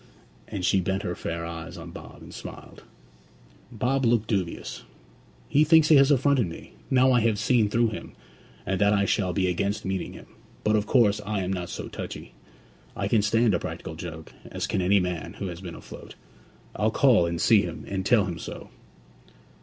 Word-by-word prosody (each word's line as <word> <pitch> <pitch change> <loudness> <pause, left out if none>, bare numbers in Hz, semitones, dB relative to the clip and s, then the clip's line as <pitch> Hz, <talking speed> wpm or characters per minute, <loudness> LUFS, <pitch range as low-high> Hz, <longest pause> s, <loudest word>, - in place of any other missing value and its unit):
And 95 -4 -4
she 95 +2 +3
bent 95 +3 -2
her 90 - -2
fair 85 -1 -4
eyes 85 -1 -7
on - - -9
Bob - - -11
and - - -12
smiled. - - -10 0.9
Bob 125 +4 0
looked 115 -2 +3
dubious. 95 -6 -3 0.7
'He 150 - +4
thinks 155 0 +5
he 155 - +8
has 135 0 +6
affronted 140 -5 +3
me, 85 - -10 0.2
now 130 0 +4
I 125 - +4
have 115 -2 +1
seen 110 0 +2
through 115 +2 +2
him, 110 - -8 0.5
and 95 0 -1
that 100 0 +4
I 100 -1 +2
shall 95 -2 +1
be 95 +1 0
against 100 +3 -1
meeting 95 -1 -3
him. - - -12 0.4
But, 105 0 +2
of 105 0 0
course, 110 -4 +3
I 105 -1 -2
am 95 +1 -2
not 90 -2 -4
so - - -6
touchy. - - -8 0.6
I - - -2
can 110 - +3
stand 115 +1 +2
a 85 - +1
practical 80 - -6
joke, 80 -1 -8 0.2
as - - -3
can - - -1
any 100 +3 +4
man 90 -3 -3
who 100 - -6
has 85 0 -8
been 90 -3 -7
afloat. - - -11 0.6
I'll 105 +3 +1
call 115 -7 +4
and 85 0 -3
see 105 +3 +5
him, - - -6
and 95 -1 -3
tell 105 0 +4
him 85 -3 -5
so.' - - -8
100 Hz, 195 wpm, -26 LUFS, 90-115 Hz, 0.9 s, he